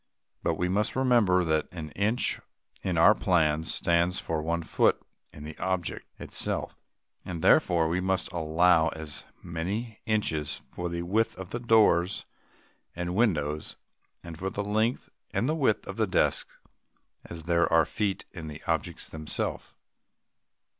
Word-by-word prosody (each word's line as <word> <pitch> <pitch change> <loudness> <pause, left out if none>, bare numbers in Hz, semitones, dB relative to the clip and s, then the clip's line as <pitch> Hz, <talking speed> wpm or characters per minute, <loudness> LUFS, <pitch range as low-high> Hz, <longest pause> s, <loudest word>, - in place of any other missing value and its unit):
But - - 0
we 90 - 0
must 100 +3 0
remember 120 -9 +4
that 80 -2 +1
an 80 -4 -7
inch 110 +7 0 0.4
in 90 -3 -1
our 95 +6 +7
plan 80 -6 +2
stands 85 +1 +2
for 80 -1 -2
a 85 +2 -1
foot - - +2 0.3
in 75 - -11
the 75 0 -7
object 95 -3 -2
itself, - - -3 0.5
and 85 -3 -6
therefore 85 -2 +4
we 85 +3 0
must 95 0 -1
allow 85 0 +3
as 80 -2 -5 0.2
many 100 +7 -4
inches 80 -9 -1
for 90 0 -4
the 85 0 -3
width 110 +6 +1
of 95 -1 -8 0.2
doors 100 -5 +4 0.7
and 90 +1 -3
windows, 75 -9 0 0.5
and 85 -2 -9
for 95 - -2
the 100 +2 -3
length 110 +4 0 0.3
and 120 - +1
width 120 -7 +2
of 95 - -7
the 110 -2 +2
desks, 90 - 0 0.7
as 85 -1 -8
there 85 0 +2
are 80 -1 +5
feet 100 +2 -2
in 85 -4 -8
the 75 +1 -9
objects - - -2
themselves. 80 -1 -4
90 Hz, 145 wpm, -28 LUFS, 80-100 Hz, 0.7 s, our